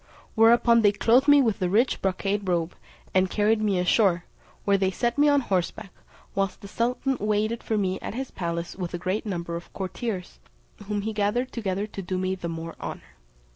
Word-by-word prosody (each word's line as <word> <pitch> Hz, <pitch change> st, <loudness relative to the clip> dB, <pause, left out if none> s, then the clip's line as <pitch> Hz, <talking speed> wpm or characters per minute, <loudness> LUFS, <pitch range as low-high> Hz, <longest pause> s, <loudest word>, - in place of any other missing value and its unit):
Whereupon 235 Hz, +1 st, +5 dB
they 205 Hz, -1 st, +4 dB
clothed 245 Hz, +7 st, +3 dB
me 290 Hz, -1 st, +7 dB
with 225 Hz, -4 st, 0 dB
the 180 Hz, -2 st, 0 dB
rich 230 Hz, +7 st, +2 dB
brocade 195 Hz, +1 st, -1 dB
robe, 170 Hz, -1 st, 0 dB, 0.4 s
and 185 Hz, 0 st, +3 dB
carried 215 Hz, +2 st, +2 dB
me 205 Hz, -3 st, +1 dB
ashore, 180 Hz, -1 st, +2 dB, 0.4 s
where 200 Hz, -, +4 dB
they 190 Hz, -1 st, +2 dB
set 235 Hz, +5 st, -1 dB
me 295 Hz, 0 st, +6 dB
on 285 Hz, -1 st, +4 dB
horseback, 195 Hz, -1 st, -2 dB, 0.4 s
whilst 195 Hz, -1 st, -1 dB
the 200 Hz, -, -9 dB
sultan 250 Hz, +5 st, -1 dB
waited 215 Hz, +2 st, 0 dB
for 220 Hz, -, -1 dB
me 190 Hz, -2 st, 0 dB
at -, -, -6 dB
his 265 Hz, +1 st, -4 dB
palace 170 Hz, -1 st, -4 dB
with 180 Hz, -2 st, -4 dB
a -, -, -2 dB
great 185 Hz, +5 st, -2 dB
number 170 Hz, -3 st, -3 dB
of 170 Hz, -, -8 dB
courtiers, 190 Hz, -, -5 dB, 0.5 s
whom 205 Hz, -1 st, -1 dB
he 220 Hz, +1 st, -2 dB
gathered 215 Hz, +5 st, 0 dB
together 200 Hz, -3 st, -2 dB
to 205 Hz, -2 st, -7 dB
do 185 Hz, 0 st, -3 dB
me 185 Hz, 0 st, -1 dB
the 175 Hz, -2 st, -5 dB
more 165 Hz, 0 st, -5 dB
honour. -, -, -7 dB
200 Hz, 195 wpm, -26 LUFS, 185-225 Hz, 0.5 s, me